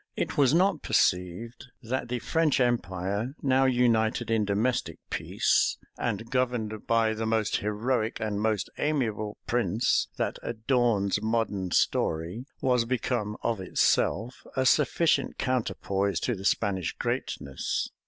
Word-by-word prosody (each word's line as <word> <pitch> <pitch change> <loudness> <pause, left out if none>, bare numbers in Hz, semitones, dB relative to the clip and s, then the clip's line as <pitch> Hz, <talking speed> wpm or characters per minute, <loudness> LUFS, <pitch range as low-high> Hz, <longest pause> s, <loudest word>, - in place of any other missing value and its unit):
It - - -2
was 135 -3 +4
not 185 +5 +3
perceived, 110 +2 0 0.2
that 120 +1 -3
the 125 - -1
French 160 +4 +1
empire, 100 0 -1
now 135 -1 +3
united 120 -2 +2
in 110 -2 +2
domestic 110 +5 0
peace, - - +1 0.2
and 115 -1 -3
governed 120 -5 -1
by 115 -1 +3
the 110 0 -3
most 110 -1 +1
heroic 110 +2 -1
and 105 -2 -2
most 110 -2 0
amiable 110 -8 -1
prince 115 -1 +1
that - - -2
adorns 110 -4 +1
modern 110 -4 -1
story, 85 - 0
was 125 -3 +2
become, 115 -3 -1
of 115 -4 -1
itself, 110 +5 0
a 130 -1 +1
sufficient 150 +5 +2
counterpoise 100 -7 -1
to 120 - 0
the 95 -3 -7
Spanish 95 -5 0
greatness. 70 -1 -3
115 Hz, 125 wpm, -28 LUFS, 105-125 Hz, 0.2 s, was